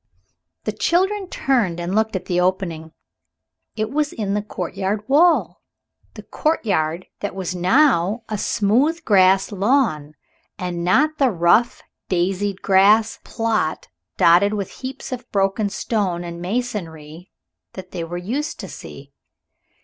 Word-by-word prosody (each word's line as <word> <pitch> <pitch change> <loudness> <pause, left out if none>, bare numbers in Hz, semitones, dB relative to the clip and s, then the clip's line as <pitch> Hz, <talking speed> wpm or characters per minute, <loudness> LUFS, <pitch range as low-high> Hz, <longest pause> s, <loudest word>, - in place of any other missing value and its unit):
The - - -2
children 380 +2 0
turned 225 -11 0
and 175 +2 -3
looked 220 0 +1
at 185 -1 -3
the 180 -1 0
opening. 180 -4 -2 0.8
It 215 0 -2
was 295 0 0
in 200 -3 -3
the 210 - 0
courtyard 205 0 -4
wall, 330 +5 +3 0.5
the - - -9
courtyard 185 - -1
that 205 - -4
was 185 -2 -3
now 210 - +2
a 215 - -3
smooth 260 +12 +1
grass 190 -2 +4
lawn 195 - 0 0.4
and 180 -3 -4
not 300 - +2
the 270 -2 +4
rough, 180 +5 +2 0.3
daisied 190 +2 -1
grass 205 +3 +4
plot 225 -9 -2 0.3
dotted 190 +5 +4
with 200 -3 -4
heaps 265 +1 -7
of 250 -1 -7
broken 200 +1 +1
stone 195 -5 -2
and 170 0 -7
masonry 175 -6 -5 0.4
that 185 -1 -10
they 170 - -4
were 170 +2 -5
used 245 - -4
to - - -7
see. - - -11
200 Hz, 135 wpm, -21 LUFS, 180-240 Hz, 0.8 s, grass